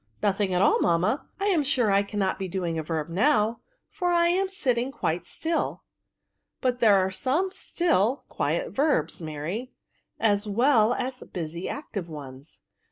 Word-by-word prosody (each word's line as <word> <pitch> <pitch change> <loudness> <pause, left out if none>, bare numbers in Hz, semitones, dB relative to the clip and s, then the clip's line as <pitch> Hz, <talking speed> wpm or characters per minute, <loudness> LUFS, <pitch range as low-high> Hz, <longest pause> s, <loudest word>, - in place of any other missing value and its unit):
" - - -31
Nothing 200 -1 +1
at 180 +1 +2
all, - - +4
mamma; 180 - +1
I 395 - -1
am 350 -6 +3
sure 250 -6 +2
I 195 0 +4
cannot 200 -1 -2
be 190 - -3
doing 175 -3 -2
a - - -1
verb 155 -1 -3
now, 215 - +2 0.3
for 360 - -3
I 340 0 +4
am 380 +2 +1
sitting 255 -8 0
quite 175 -8 -2
stiU." 325 - -2 0.4
*' - - -55
But 250 -2 0
there 220 -4 +6
are 190 0 +1
some 300 - 0
still, 280 - 0
quiet - - -1
verbs, 270 - +1
Mary, 165 - -5 0.5
as 205 -1 +2
well 235 +1 +3
as 255 0 -4
busy 170 0 -4
active 200 - -5
ones. 140 -1 -10
210 Hz, 165 wpm, -26 LUFS, 175-275 Hz, 0.5 s, there